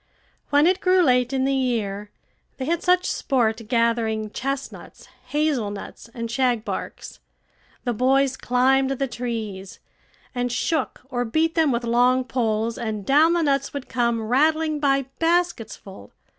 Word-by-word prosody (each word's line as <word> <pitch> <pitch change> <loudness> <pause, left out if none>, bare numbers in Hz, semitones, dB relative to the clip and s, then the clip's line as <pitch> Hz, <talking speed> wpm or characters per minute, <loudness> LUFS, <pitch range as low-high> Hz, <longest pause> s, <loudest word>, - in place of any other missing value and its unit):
When 290 +1 +4
it 370 +2 +3
grew 370 0 +4
late 250 -4 +2
in 265 -1 0
the 275 - +1
year, 215 -6 -1 0.5
they 260 - -4
had 335 +3 0
such 360 0 +3
sport 230 -4 0
gathering 230 -2 0
chestnuts, 275 +2 -6 0.2
hazelnuts, 245 -9 -2
and 230 -1 -4
shagbarks; 240 -2 -2 0.6
the 245 - -1
boys 265 +3 +2
climbed 265 +2 +2
the 270 0 -1
trees, 220 -6 -5 0.6
and 245 -1 -2
shook 290 +3 -1
or 245 -1 0
beat 315 +8 0
them 320 -3 +2
with 240 0 -1
long 245 +2 +3
poles, 230 -2 -1
and 215 -3 -4
down 310 +5 +4
the 340 -1 +1
nuts 275 -1 0
would 280 -2 -5
come 235 -3 0
rattling 310 +6 +1
by 275 -1 +2 0.2
baskets 335 -9 0
full. 190 - -13
255 Hz, 145 wpm, -23 LUFS, 230-285 Hz, 0.6 s, When